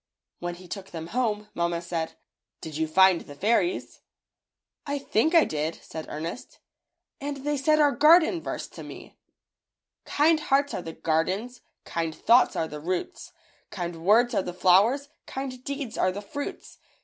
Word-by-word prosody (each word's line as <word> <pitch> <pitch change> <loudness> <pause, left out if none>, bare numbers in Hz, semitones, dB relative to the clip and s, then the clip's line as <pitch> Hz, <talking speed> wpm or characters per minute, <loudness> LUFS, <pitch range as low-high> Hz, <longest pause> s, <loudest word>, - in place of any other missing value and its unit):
When 175 0 -4
he 180 +1 -13
took 195 +1 -7
them 165 0 -7
home, 215 -4 -1
mamma 170 0 -1
said, 170 -1 -4 0.5
"Did 155 -2 -8
you 160 0 -1
And 190 -2 +6
the 145 - -11
fairies?" 230 - 0 0.9
"I 285 0 -1
think 280 +4 +1
I 330 - +7
did," 155 +2 -2
said 160 -1 -7
Ernest, 165 +9 -6 0.6
"and 280 -1 -5
they 295 0 +1
said 305 +3 +2
our 290 -2 +4
^Garden 330 +3 +5
verse^ - - -5
to - - -10
me - - -11 0.5
— - - -62
'Kind 310 +2 +3
hearts 285 -1 +1
are - - -3
the 165 -1 -7
gardens, 190 +12 -1 0.2
Kind 165 -2 -3
thoughts 240 +2 +4
are 160 - -1
the 150 -1 -7
roots, 185 - -4 0.4
Kind 170 -3 -5
words 235 +6 +4
are 210 - +2
the 180 -1 -6
flowers. 210 +11 +4 0.2
Kind 260 -2 -6
deeds 275 -4 -5
are 185 - +3
the 200 +3 -7
fruits. 285 +8 -7
210 Hz, 165 wpm, -26 LUFS, 170-280 Hz, 0.9 s, I